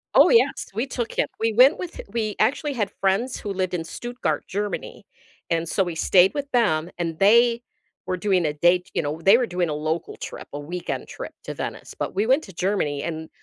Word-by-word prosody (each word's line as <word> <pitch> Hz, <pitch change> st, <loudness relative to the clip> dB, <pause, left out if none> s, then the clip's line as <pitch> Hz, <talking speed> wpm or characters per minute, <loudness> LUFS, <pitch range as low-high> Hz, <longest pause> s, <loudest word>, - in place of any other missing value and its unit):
Oh -, -, +8 dB
yes, 465 Hz, -, +3 dB
we 230 Hz, +7 st, -2 dB
took 240 Hz, -3 st, -3 dB
him; -, -, +1 dB
we 225 Hz, 0 st, +1 dB
went 255 Hz, +7 st, +6 dB
with 360 Hz, -2 st, -6 dB
we 215 Hz, -2 st, -2 dB
actually 280 Hz, +6 st, +1 dB
had 220 Hz, -6 st, -2 dB
friends 200 Hz, +7 st, +1 dB
who 205 Hz, -, -5 dB
lived 185 Hz, -1 st, -2 dB
in 170 Hz, -2 st, -1 dB
Stuttgart, 240 Hz, +9 st, -3 dB
Germany, 205 Hz, +1 st, -4 dB, 0.5 s
and 165 Hz, 0 st, 0 dB
so 195 Hz, -, +1 dB
we 175 Hz, -3 st, -4 dB
stayed 180 Hz, +3 st, +4 dB
with 285 Hz, -1 st, -4 dB
them 175 Hz, -10 st, +2 dB
and 165 Hz, -2 st, -3 dB
they 235 Hz, +4 st, +5 dB, 0.4 s
were 185 Hz, -, -2 dB
doing 185 Hz, -3 st, +1 dB
a 150 Hz, -, 0 dB
date, 175 Hz, +4 st, +2 dB
you -, -, +1 dB
know, 150 Hz, +2 st, -3 dB
they 195 Hz, +6 st, +7 dB
were 250 Hz, -, +1 dB
doing 180 Hz, -4 st, -1 dB
a -, -, -1 dB
local 155 Hz, +2 st, -3 dB
trip, -, -, -8 dB
a 145 Hz, -, -4 dB
weekend 175 Hz, +5 st, -5 dB
trip -, -, -7 dB
to -, -, -5 dB
Venice, -, -, -6 dB
but -, -, -4 dB
we 205 Hz, +3 st, +1 dB
went 265 Hz, +6 st, +3 dB
to 190 Hz, -, -13 dB
Germany 170 Hz, -6 st, -1 dB
and 160 Hz, -1 st, -5 dB
195 Hz, 215 wpm, -24 LUFS, 170-235 Hz, 0.5 s, Oh